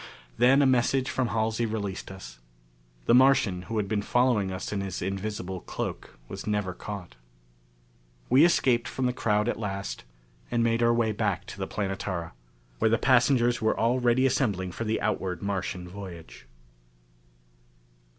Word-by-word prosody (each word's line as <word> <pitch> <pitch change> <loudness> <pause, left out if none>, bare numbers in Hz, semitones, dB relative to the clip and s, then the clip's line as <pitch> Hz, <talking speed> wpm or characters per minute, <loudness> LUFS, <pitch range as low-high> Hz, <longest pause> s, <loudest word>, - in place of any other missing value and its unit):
Then 135 - +5
a - - +4
message 130 +1 +2
from 130 -2 0
Halsey 115 0 0
released 100 -3 -4
us. - - -10 0.7
The - - +4
Martian 125 -8 +4
who 115 - -2
had 105 -2 0
been 105 0 0
following 120 -4 +2
us 95 - -5
in 100 - -1
his 95 -2 -4
invisible 95 0 -4
cloak - - -6
was - - -8
never 105 -3 -1
caught. 95 -6 -7 1.1
We 130 +5 +6
escaped 125 -8 +3
from 130 - -2
the 125 - +1
crowd 105 -3 +1
at 120 - -1
last 100 -2 -4 0.5
and 120 -1 +1
made 115 0 +1
our 120 0 +4
way 115 -2 +2
back 100 -3 -1
to - - -10
the - - -3
Planetara, 95 -4 -3 0.5
where - - +3
the 115 - +3
passengers 120 -1 +3
were 110 - +1
already 120 +2 +2
assembling 100 -9 0
for 115 - -5
the 110 +1 0
outward 95 -1 -2
Martian 95 -2 -3
voyage. 90 -9 -10
110 Hz, 155 wpm, -27 LUFS, 95-120 Hz, 1.1 s, We